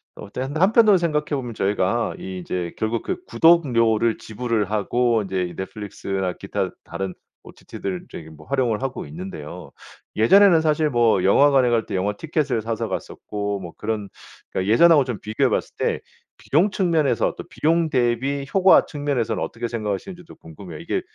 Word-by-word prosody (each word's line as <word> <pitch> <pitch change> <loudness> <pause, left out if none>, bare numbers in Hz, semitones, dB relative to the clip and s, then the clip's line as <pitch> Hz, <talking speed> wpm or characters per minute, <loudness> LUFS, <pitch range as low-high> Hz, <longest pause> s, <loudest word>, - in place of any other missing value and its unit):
어 - - -10
또 125 - -5
근데 145 +4 -4
한편으로 210 +2 +5
생각해 155 -4 0
보면 130 -5 -3
저희가 105 +3 0
이 95 -1 -6
이제 90 -1 -4
결국 110 +1 -2
그 370 0 -4
구독료를 115 - +3
지불을 110 -2 -2
하고 115 +2 +1
이제 95 -1 -2
이 90 - -6
넷플릭스나 95 -1 -4
기타 - - -3
다른 95 -1 -5 0.3
OTT들 95 -2 -7
저기 80 -1 -9
뭐 80 - -15
활용을 125 -5 0
하고 135 -1 -4
있는데요. 80 0 -8 0.4
예전에는 175 - +6
사실 155 -1 +1
뭐 115 -7 +2
영화관에 135 +4 +4
갈 115 -2 +1
때 - - -5
영화 100 +2 0
티켓을 145 -2 -1
사서 115 0 -3
갔었고 100 +1 -4
뭐 85 -3 -9
그런 105 -2 -3 0.4
그러니까 95 +3 -1
예전하고 155 +3 +6
좀 120 -6 -4
비교해 125 +5 0
봤을 - - -2
때 - - 0 0.4
비용 170 +9 +2
측면에서 170 -7 +1
또 - - -6
비용 165 +1 +1
대비 130 +2 0
효과 190 -1 +6
측면에서는 145 -6 -2
어떻게 120 +1 -4
생각하시는지도 115 - -5
궁금해요. 80 0 -11
이게 - - -2
115 Hz, 380 characters per minute, -22 LUFS, 100-150 Hz, 0.4 s, 예전에는